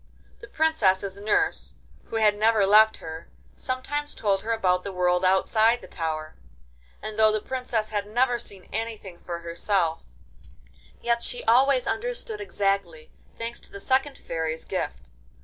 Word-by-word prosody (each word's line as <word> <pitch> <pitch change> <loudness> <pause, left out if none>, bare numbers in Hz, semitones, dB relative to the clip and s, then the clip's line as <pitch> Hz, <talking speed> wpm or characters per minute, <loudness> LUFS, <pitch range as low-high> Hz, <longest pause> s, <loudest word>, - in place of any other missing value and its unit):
The - - -11
Princess's 200 - +1
nurse, 70 - 0 0.3
who - - -8
had 215 -2 +4
never 215 -1 +3
left 215 +2 +6
her, 160 0 -8 0.3
sometimes 290 +3 -3
told 195 -3 +1
her 225 - -3
about 185 -5 +2
the 200 - -5
world 180 0 +1
outside 220 +5 +3
the - - -12
tower, 155 -2 -4 0.7
and 215 0 -5
though 215 0 +6
the 215 - 0
Princess 240 -2 -2
had 205 -1 -2
never 240 +2 +1
seen 195 -5 -9
anything 215 -5 -5
for 170 -1 -6
herself, 170 - -1 0.9
yet 235 0 +1
she 245 - -3
always 255 +3 +4
understood 470 -1 -3
exactly, 195 - -2 0.3
thanks 230 +1 -5
to - - -17
the 200 - -8
second 265 +5 0
Fairy's 160 -1 -4
gift. 65 +1 -3
210 Hz, 150 wpm, -26 LUFS, 180-235 Hz, 0.9 s, left